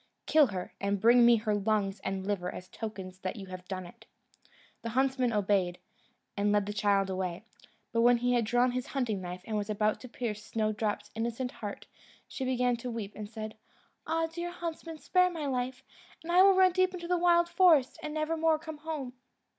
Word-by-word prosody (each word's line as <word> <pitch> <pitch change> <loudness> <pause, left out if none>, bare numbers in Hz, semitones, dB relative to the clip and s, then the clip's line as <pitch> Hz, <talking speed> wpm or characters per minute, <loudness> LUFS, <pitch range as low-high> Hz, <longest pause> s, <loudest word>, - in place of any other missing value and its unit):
Kill 305 -3 +5
her, 185 -4 -5
and 200 0 0
bring 235 +4 +6
me 240 - +7
her 215 -1 0
lungs 205 -1 0
and 190 0 -3
liver 190 -3 -1
as 185 - -9
tokens 190 -4 -7
that 185 +2 -4
you 200 -3 -7
have 185 -1 -9
done 185 -2 -4
it." 175 - -15 0.7
The 230 - -4
huntsman 260 0 +1
obeyed, 195 -4 +1 0.6
and 205 0 +1
led 205 -1 +2
the 205 - -4
child 200 -1 +2
away; 185 0 -3 0.5
but 230 - +2
when 240 +1 +6
he 245 +1 +1
had 240 -1 +3
drawn 245 +3 +2
his 250 0 -3
hunting 235 -8 -2
knife, 180 0 -7
and 220 - -3
was 205 0 -3
about 215 0 0
to 255 - -9
pierce 215 -3 -4
Snowdrop's 215 -1 -2
innocent 235 +3 -2
heart, 205 -2 -7 0.4
she 265 - -5
began 250 -1 +1
to 245 +2 -5
weep, 220 -4 -5
and 210 -1 -7
said, 220 -1 -6 0.5
"Ah! 325 +1 +1
dear 340 +2 -5
huntsman, 330 -2 -6
spare 365 +3 +3
my 325 -4 -5
life, 260 -1 -2 0.4
and 335 - -4
I 360 +1 +6
will 390 0 +7
run 375 0 +6
deep 370 +1 +1
into 345 -1 -6
the 355 0 +1
wild 345 0 +4
forest, 340 -8 +4
and 305 - -4
never 310 +1 -1
more 320 0 +3
come 315 0 -8
home." 300 -5 -5
235 Hz, 200 wpm, -30 LUFS, 205-305 Hz, 0.7 s, me